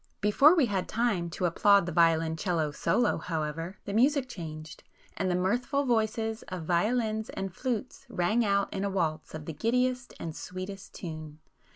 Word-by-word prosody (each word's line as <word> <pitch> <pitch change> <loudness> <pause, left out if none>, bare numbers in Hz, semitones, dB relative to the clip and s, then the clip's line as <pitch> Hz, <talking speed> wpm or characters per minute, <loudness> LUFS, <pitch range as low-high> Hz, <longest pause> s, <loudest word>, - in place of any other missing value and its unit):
Before 275 - +6
we 310 -6 +4
had 195 -5 -1
time 215 -7 0
to 180 +2 -2
applaud 200 +3 +4
the 175 - -3
violoncello 160 -1 +2
solo 235 +9 +1
however, 165 +2 -3
the 200 - -4
music 265 +4 +3
changed,—and 160 -1 -7
the 180 - +1
mirthful 245 +10 0
voices 225 -2 0
of 180 -3 -5
violins 215 +5 +1
and 195 -2 -5
flutes 255 +4 -4
rang 215 +3 +1
out 200 -1 +1
in 195 - -2
a 200 - 0
waltz 160 -5 -2
of 155 -1 -7
the 160 - -5
giddiest 250 - 0
and 160 -2 -5
sweetest 185 +1 -7
tune. 155 -3 -7
195 Hz, 160 wpm, -29 LUFS, 165-230 Hz, -, Before